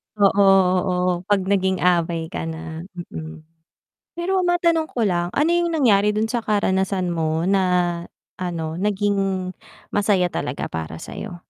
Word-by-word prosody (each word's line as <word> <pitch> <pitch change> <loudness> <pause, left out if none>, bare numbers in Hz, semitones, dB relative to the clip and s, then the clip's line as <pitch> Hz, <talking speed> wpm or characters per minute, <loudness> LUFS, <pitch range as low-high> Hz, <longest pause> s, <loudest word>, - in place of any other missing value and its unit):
Oo 200 -1 +4 0.4
oo, 180 -1 0 0.2
'pag 205 -2 +3
naging 190 -1 +1
abay 170 -2 +1
ka - - -4
na. 160 +1 -7 0.2
Mm. 160 0 -8 0.7
Pero 370 +2 0
matanong 340 -2 +2
ko 235 - -1
lang, 175 -3 0
ano 300 +4 +3
yung 345 0 +2
nangyari 210 -9 +3
dun 215 +1 +1
sa 240 -1 -1
karanasan 190 -3 0
mo 160 0 -1
na 195 +1 +2 0.8
ano, 165 -3 -3
naging 195 -2 0 0.4
masaya 200 -3 +2
talaga - - -3
para 80 0 -5
sa'yo? 180 - -7
190 Hz, 135 wpm, -22 LUFS, 170-210 Hz, 0.8 s, Oo